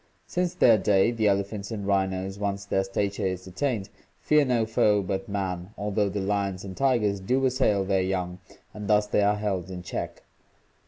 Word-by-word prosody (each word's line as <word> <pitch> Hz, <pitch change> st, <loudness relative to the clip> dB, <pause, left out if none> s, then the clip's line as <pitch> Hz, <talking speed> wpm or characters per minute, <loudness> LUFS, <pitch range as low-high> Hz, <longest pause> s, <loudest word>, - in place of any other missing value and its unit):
Since 180 Hz, 0 st, -1 dB
their 115 Hz, -, +5 dB
day 95 Hz, +3 st, +3 dB
the 110 Hz, -3 st, +1 dB
elephants 100 Hz, +1 st, -1 dB
and 105 Hz, -4 st, -4 dB
rhinos, 95 Hz, 0 st, -1 dB
once 100 Hz, -1 st, -2 dB
their 95 Hz, -1 st, +1 dB
stature 100 Hz, +1 st, -1 dB
is 95 Hz, 0 st, -4 dB
attained, 100 Hz, +2 st, -2 dB, 0.3 s
fear 150 Hz, -1 st, +4 dB
no 125 Hz, -4 st, +1 dB
foe 105 Hz, -2 st, +2 dB
but 95 Hz, +1 st, -3 dB
man, 95 Hz, -1 st, -3 dB
although 105 Hz, 0 st, 0 dB
the 100 Hz, -, -3 dB
lions 100 Hz, -1 st, -1 dB
and 95 Hz, -1 st, -7 dB
tigers 115 Hz, -7 st, +1 dB
do 130 Hz, +8 st, +1 dB
assail 125 Hz, -7 st, +2 dB
their 95 Hz, -1 st, +2 dB
young 90 Hz, -1 st, -2 dB, 0.3 s
and 105 Hz, -1 st, -7 dB
thus 105 Hz, 0 st, +4 dB
they 105 Hz, 0 st, +1 dB
are 100 Hz, +1 st, +3 dB
held 95 Hz, -4 st, -2 dB
in 90 Hz, -1 st, -7 dB
check. 80 Hz, -, -5 dB
100 Hz, 180 wpm, -26 LUFS, 95-105 Hz, 0.3 s, their